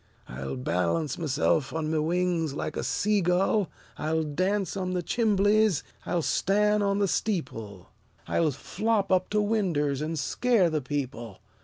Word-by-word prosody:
I'll 65 +1 -5
balance 90 - -1
myself 150 -2 +1
on 160 -1 -2
my 160 - +1
wings 165 -2 0
like - - -4
a - - -2
sea 210 0 +1
gull; 180 +1 +2 0.3
I'll 160 +1 0
dance 185 +6 -1
on 185 -1 -2
the 180 -1 -1
chimbleys; 210 - +2 0.2
I'll 170 -2 0
stan' 210 +5 +2
on 200 -1 +1
the 200 -1 +2
steeple; 115 - -3 0.4
I'll 165 -2 +2
flop 205 - -1
up 185 -1 +2
to 210 - +1
winders 165 -10 0
an' 160 +2 -2
scare 185 - +2
the 155 -1 0
people! 125 -6 -4
170 Hz, 150 wpm, -27 LUFS, 145-200 Hz, 0.4 s, gull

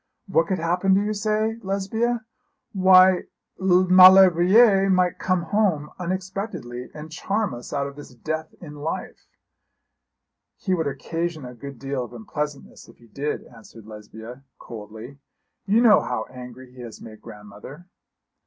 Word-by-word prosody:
What 165 -5 +1
could 190 - -1
happen, 180 +3 +1
do 195 - +2
you 210 +1 -2
say, 215 +1 -1
Lesbia? 220 +4 -2 0.5
Why 185 -1 +5 0.3
Maulevrier 185 +2 +6
might 180 -2 +1
come 185 -2 0
home 165 -5 0
unexpectedly, 185 - -5
and 155 +1 -9
charm 200 - -2
us 120 0 -9
out 140 -1 -2
of 140 0 -8
this 145 -3 -13
death 155 +5 -5
in 155 -4 -10
life.' 150 +3 -6 1.3
'He 190 - -2
would 165 -4 -1
occasion 160 +2 -4
a 125 - -9
good 140 +2 -10
deal 135 0 -4
of 120 - -11
unpleasantness 145 +5 -7
if - - -18
he 120 - -20
did,' 140 +6 -4
answered 115 -2 -16
Lesbia, 110 +4 -11
coldly. 110 +4 -11 0.5
'You 215 +4 +3
know 225 -4 +6
how 125 -3 -3
angry 125 0 -11
he 125 - -12
has 115 -3 -10
made 110 -1 -13
grandmother.' 105 - -12
160 Hz, 145 wpm, -23 LUFS, 125-190 Hz, 1.3 s, Maulevrier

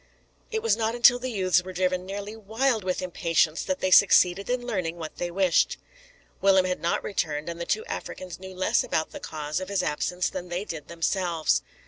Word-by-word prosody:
It 440 0 -2
was 460 - +3
not 225 0 -1
until 245 +1 +6
the 255 +1 -4
youths 185 -5 +2
were 185 0 -8
driven 185 0 -1
nearly 200 +2 -5
wild 225 +2 0
with 185 0 -2
impatience 165 -2 +1
that 280 -1 -2
they 185 - 0
succeeded 190 0 +5
in 245 0 -1
learning 180 -8 -2
what 160 -2 -7
they 175 - -2
wished. 180 0 +2 0.6
Willem 190 -1 +5
had 180 0 -2
not 170 - 0
returned, 155 -6 -2
and 170 0 -5
the 170 - -4
two 445 - 0
Africans 180 - -6
knew 190 0 -9
less 185 - +2
about 160 - -1
the - - -8
cause 150 0 -4
of 185 0 -6
his 195 -2 0
absence 180 +4 -1
than 180 -1 -6
they 180 +4 -3
did 155 -7 -7
themselves. 170 -1 0
185 Hz, 200 wpm, -26 LUFS, 170-205 Hz, 0.6 s, until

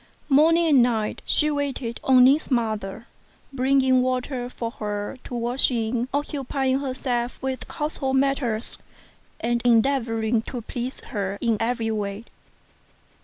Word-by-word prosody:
Morning 325 +4 +5
and 300 -4 +4
1 - - +7
night 225 -3 0
she 300 0 +2
waited 275 -5 -3
on 255 -1 +6
Ning's 275 +5 +4
mother, 220 -4 -2 0.5
bringing 260 0 +3
water 255 0 -2
for 230 -2 -5
her 210 +3 -5
to 245 - -6
wash 240 +2 +4
in, 235 0 -1
occupying 275 -2 -1
herself 255 -3 -3
with 265 -1 -4
household 290 -3 -2
matters, 265 -5 0 0.6
and 235 0 0
endeavouring 230 -2 +2
to 240 +1 -6
please 245 +3 -5
her 200 -4 -4
in 230 -2 +1
every 225 -1 -1
way. 205 0 -4
250 Hz, 130 wpm, -24 LUFS, 230-270 Hz, 0.6 s, 1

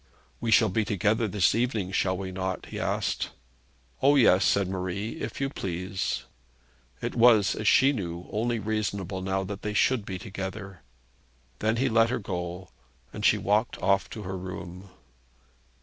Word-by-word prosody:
'We 115 - -2
shall 110 -1 +5
be 110 +4 +1
together 105 +2 +1
this 100 -4 +2
evening; 115 -6 -1
shall 95 -1 +1
we 95 -1 -5
not?' 95 0 -3
he - - -7
asked. - - -1 0.7
'O, 140 +2 +5
yes,' 105 -8 +5
said 100 -2 +2
Marie, 95 +3 -4
'if 110 +1 -5
you 135 - +1
please.' 95 -5 -3 0.8
It - - -2
was, 115 -4 +5
as 110 - -3
she 135 +6 +5
knew, 85 -7 -5
only 115 +3 0
reasonable 100 -3 -2
now 95 +1 -1
that 100 +1 -6
they 105 0 -3
should 125 0 +3
be 95 -2 -5
together. 95 -1 -7 0.8
Then 110 +1 +1
he 130 +3 +1
let 115 -1 +4
her 125 - 0
go, 90 -3 -5 0.4
and - - -6
she - - +5
walked 105 +4 +1
off 95 -1 +1
to 110 - -7
her 95 0 -5
room. 90 +1 -8
100 Hz, 165 wpm, -27 LUFS, 95-110 Hz, 0.8 s, shall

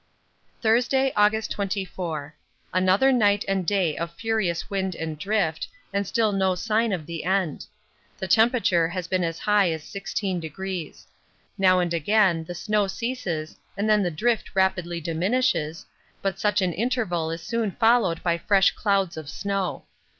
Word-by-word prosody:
Thursday, 250 +4 +2
August 210 +1 +2
24. 185 -7 -3 0.4
Another 185 +8 +4
night 205 -5 +3
and 190 -3 -1
day 185 -6 +1
of 170 0 -4
furious 175 -2 -1
wind 190 -2 -2
and 160 -2 -5
drift, 175 -3 0 0.3
and 200 -1 -1
still 220 0 +1
no 190 -2 +1
sign 220 +4 0
of 175 -6 -3
the 165 +1 -5
end. 185 -4 -1 0.5
The 190 - -4
temperature 220 -5 +3
has 175 0 -4
been 185 -1 0
as 165 -1 -2
high 205 -2 +3
as 160 -2 -3
16°. 190 -3 -4 0.5
Now 185 -1 +5
and 175 -1 0
again 175 0 +2
the 175 - -7
snow 210 +2 0
ceases 190 -7 -4 0.2
and 205 +2 0
then 215 -1 +4
the 180 - +1
drift 220 +7 -1
rapidly 180 -3 +1
diminishes, 165 -1 0 0.4
but 195 -1 -1
such 205 -2 +2
an 180 -2 0
interval 200 -7 -1
is 165 0 -5
soon 230 +2 -1
followed 225 -5 +2
by 170 -1 +1
fresh 195 0 +4
clouds 195 -5 0
of 155 -2 -7
snow. 195 +4 -3
190 Hz, 150 wpm, -25 LUFS, 170-210 Hz, 0.5 s, Now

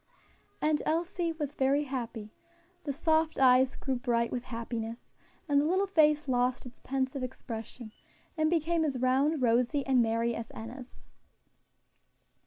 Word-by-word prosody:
And 305 -1 +2
Elsie 340 +1 -1
was 300 -3 -4
very 275 +2 +2
happy; 230 -6 -5 0.5
the 285 - -1
soft 315 +2 +1
eyes 260 0 +5
grew 265 -2 -2
bright 235 -2 0
with 245 0 -4
happiness, 230 -1 -5 0.4
and 285 -2 +3
the - - 0
little 375 +5 +2
face 305 -5 +3
lost 250 0 0
its 250 0 -12
pensive 265 0 -2
expression, 235 -2 -7 0.4
and 310 -1 +2
became 335 0 +1
as 285 -4 -1
round, 265 +3 +2
rosy 245 +4 +2
and 260 -2 +4
merry 230 +1 +1
as 230 -1 -6
Enna's. 245 +3 -9
265 Hz, 140 wpm, -30 LUFS, 240-305 Hz, 0.5 s, eyes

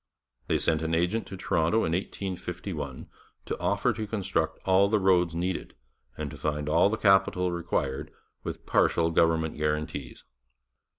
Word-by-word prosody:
They - - +2
sent 80 -1 +1
an 80 0 0
agent 90 +7 0
to 95 - -7
Toronto 85 +5 +1
in 80 - -1
1851 90 -5 -4 0.4
to - - -4
offer - - +1
to 110 - -4
construct 95 -6 -1
all 95 +1 +4
the 110 - +3
roads 90 -4 +3
needed, 90 +2 -3 0.4
and 75 -2 -4
to 70 - -9
find 75 +2 -2
all 80 +6 +4
the 110 - -1
capital 95 -3 +3
required, 80 -6 -2 0.3
with - - -6
partial 85 0 +2
government 80 -1 +2
guarantees. 75 -3 -3
85 Hz, 145 wpm, -28 LUFS, 75-95 Hz, 0.4 s, all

